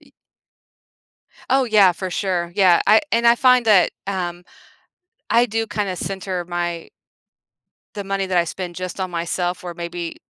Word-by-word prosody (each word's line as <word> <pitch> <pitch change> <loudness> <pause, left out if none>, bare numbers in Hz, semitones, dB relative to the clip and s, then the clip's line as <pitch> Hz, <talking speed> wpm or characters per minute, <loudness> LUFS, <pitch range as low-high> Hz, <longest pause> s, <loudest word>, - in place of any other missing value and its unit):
Y - - -23 1.4
Oh, 265 0 +3
yeah, 205 -5 +5
for 185 +2 -6
sure, 175 -3 -2
yeah, 185 -4 +5
I 215 - +6
and 235 +1 +2
I 235 - +7
find 250 -1 +4
that, 205 -4 +5 0.2
um, 175 -3 -4 0.8
I 235 +1 +4
do 225 0 -2
kinda 205 -3 -3
center 190 -2 -4
my 175 -1 -4 1.1
the 205 -1 -5
money 195 0 -2
that 185 -1 0
I 170 - +3
spend 175 +1 -6
just 185 +1 -6
on 185 -1 -3
myself 175 +1 -3
where 175 -1 -7
maybe 170 0 -6
185 Hz, 155 wpm, -20 LUFS, 175-205 Hz, 1.4 s, I